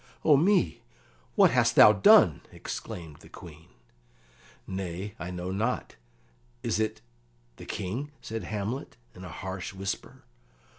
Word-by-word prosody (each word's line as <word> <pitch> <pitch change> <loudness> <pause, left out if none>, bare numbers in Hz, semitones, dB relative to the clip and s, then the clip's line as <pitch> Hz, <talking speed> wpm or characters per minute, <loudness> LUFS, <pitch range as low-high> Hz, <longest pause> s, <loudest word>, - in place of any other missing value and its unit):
"O 150 - +7
me, 165 - +2 0.5
what - - +6
hast - - +2
thou 105 - +9
done?" 100 - +6
exclaimed 80 -4 -7
the - - -17
Queen. 80 -1 -13 1.0
"Nay, 95 +1 -5
I 90 - -5
know 90 0 -5
not. 110 - -2 0.7
Is - - 0
it 110 0 -2 0.6
the - - -11
King?" 120 +11 -4
said 110 -5 -6
Hamlet, 110 +6 -4 0.2
in 90 - -12
a 90 - -8
harsh 95 +3 -6
whisper. 100 +1 -5
95 Hz, 130 wpm, -28 LUFS, 90-110 Hz, 1.0 s, thou